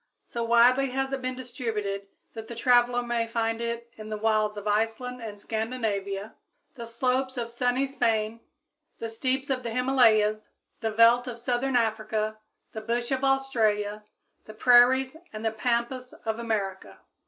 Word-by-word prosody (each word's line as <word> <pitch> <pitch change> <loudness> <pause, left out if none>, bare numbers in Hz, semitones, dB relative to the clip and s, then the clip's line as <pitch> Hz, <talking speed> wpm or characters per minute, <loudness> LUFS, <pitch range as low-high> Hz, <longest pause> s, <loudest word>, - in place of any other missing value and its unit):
So 235 - -4
widely 245 +3 +4
has 270 +1 -2
it 270 - -2
been 255 0 -3
distributed 225 -6 -4 0.3
that 225 -1 -8
the 235 - -7
traveler 245 +1 +3
may 240 -1 -1
find 225 0 -1
it 235 0 -4
in 215 0 -8
the 215 - -3
wilds 215 -1 +1
of 205 0 -6
Iceland 225 +4 -1
and 210 -3 -7
Scandinavia, 215 -3 -3 0.4
the 235 -3 -8
slopes 255 +3 -1
of 235 -1 -3
sunny 250 +2 +1
Spain, 225 -5 0 0.6
the 230 - -5
steeps 260 +4 -1
of 255 -1 0
the 235 - -4
Himalayas, 225 -4 +3 0.3
the 225 - -1
veldt 230 +3 +5
of 240 -2 -5
southern 250 +2 -1
Africa, 215 -1 0 0.3
the 220 - -6
bush 235 +3 -2
of 265 0 0
Australia, 220 -6 +1 0.4
the 215 - -11
prairies 255 +4 +5
and 215 +1 -6
the 225 - +2
pampas 240 +3 -2
of 220 0 -2
America. 195 - -3
235 Hz, 155 wpm, -27 LUFS, 215-250 Hz, 0.6 s, veldt